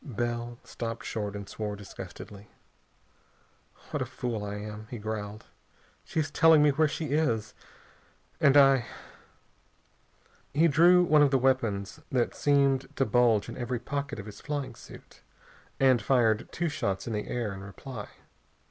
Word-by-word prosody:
Bell 120 -2 -3
stopped 115 +1 -6
short 105 -2 -3
and 100 -1 -6
swore 105 0 -4
disgustedly. 100 0 -10 1.4
"What - - -2
a - - 0
fool 115 -4 -4
I 100 0 -4
am!" 105 +1 -7
he 120 - -6
growled. 105 0 -5 0.6
"She's 155 -2 -2
telling 160 -3 +6
me 150 - +5
where 155 +3 +3
she 155 +1 -4
is, 115 -9 0 0.9
and 140 0 +5
I 135 -3 +5 0.8
" - - -36
He 160 +3 +5
drew 175 +4 +6
one 155 -3 +4
of 145 - +5
the 135 - +3
weapons 120 -4 0
that 125 -3 +1
seemed 140 -2 +2
to 135 - +1
bulge 115 -2 +3
in - - -7
every 125 0 -2
pocket 140 +3 -4
of 100 - -7
his 105 -1 -10
flying 145 -2 -4
suit - - -14 0.6
and 130 -3 +4
fired 115 -2 +2
two 170 - -1
shots 100 -10 -2
in 115 - -4
the 105 - -3
air 115 -5 -2
in 95 - -8
reply. 100 +3 -8
120 Hz, 155 wpm, -28 LUFS, 105-140 Hz, 1.4 s, telling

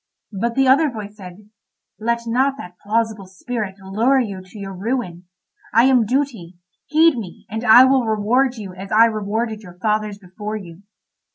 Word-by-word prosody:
But 230 +4 -2
the 270 -1 +3
other 285 +4 +5
voice 210 -4 -8
said: 190 +1 -12 0.5
"Let 235 +2 -1
not 260 +4 +1
that 180 -7 -11
plausible 215 -2 -1
spirit 195 +1 -5
lure 215 +8 +1
you 200 -6 -3
to 185 +3 -15
your 195 -1 -7
ruin. 190 -3 -4 0.5
I 230 - +6
am 255 -4 +4
Duty; 235 -10 -2 0.3
heed 315 -3 +4
me, 190 -6 -10
and 220 +2 -4
I 245 +2 +8
will 260 -3 +2
reward 235 +5 +1
you 200 -5 -8
as 195 +2 -9
I 220 +2 +6
rewarded 220 0 -2
your 180 -4 -13
fathers 210 +1 -1
before 205 +3 -7
you." 180 -4 -9
215 Hz, 170 wpm, -20 LUFS, 195-245 Hz, 0.5 s, I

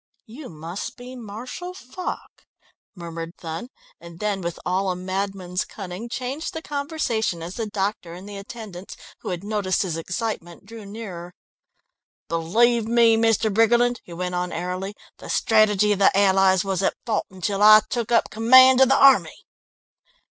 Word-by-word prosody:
"You 255 +5 -10
must 165 +4 -7
be 250 +1 -10
Marshal 250 - -8
Foch," 360 +3 -8 0.5
murmured 170 -1 -7
Thun, 165 +9 -6 0.3
and 170 0 -13
then 205 -2 -1
with 170 -1 -5
all 190 +2 0
a 180 - -1
madman's 185 0 -3
cunning, 195 +3 -8
changed 260 +6 -4
the 320 - -4
conversation 280 - -2
as 175 +2 -6
the 225 0 -4
doctor 195 -4 -3
and 185 +3 -11
attendants, 200 -2 -9 0.2
who - - -6
had 180 0 -4
noticed 205 -3 0
his 170 -4 -3
excitement, 175 0 -5
drew 220 -1 -11
nearer. 185 -5 -8 0.9
"Believe 220 +8 +2
me, 230 -1 +5
Mr. 225 -2 +2
Briggerland," 240 +2 +3
he - - -15
went 180 +1 -4
on 180 0 -2
airily, 180 +4 -4 0.2
"the - - -10
strategy 210 -2 +3
of 200 - 0
the 195 - +6
Allies 190 -1 +4
was 195 -1 -1
at - - +1
fault 220 -3 -1
until 190 +2 -3
I 215 +1 +9
took 235 -2 -3
up 235 - +5
the - - -13
command 260 +4 +7
of 265 - +6
the 270 - +4
army...." 275 -1 +4
205 Hz, 160 wpm, -23 LUFS, 180-230 Hz, 0.9 s, I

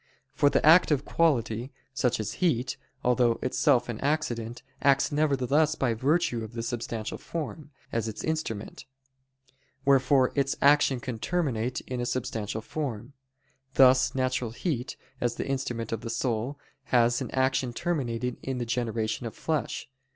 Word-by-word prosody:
For 145 - +4
the - - +1
active 155 -3 +6
quality, 125 -6 +1 0.2
such 125 -3 +1
as 110 -1 -3
heat, 130 -8 +1 0.3
although 120 -2 +3
itself 125 -1 +2
an 115 -2 -4
accident, 120 -6 -1 0.2
acts 140 -1 +3
nevertheless 145 +1 +2
by 130 -6 +1
virtue 130 -1 +1
of 110 +1 -8
the 115 -1 -4
substantial 115 -2 -4
form, 155 -2 -5 0.2
as 115 -1 -1
its 110 - -5
instrument: 155 -10 -3 1.0
wherefore 135 -1 +4
its 140 -1 +1
action 140 -2 +4
can 120 -2 -5
terminate 130 -7 -1
in 125 -1 -4
a 120 - -2
substantial 115 -4 -3
form; 130 -2 -5 0.6
thus 130 -1 +5
natural 130 -2 0
heat, 125 +1 -3 0.2
as 120 - 0
the - - -3
instrument 125 -4 -2
of 115 - -2
the 115 - -5
soul, 120 +3 -1 0.3
has 120 -1 +3
an - - -3
action 130 -1 +1
terminating 125 -4 -2
in 130 -1 -3
the 120 - -2
generation 115 -1 -2
of 115 - -8
flesh. 155 -2 -2
125 Hz, 145 wpm, -28 LUFS, 115-140 Hz, 1.0 s, active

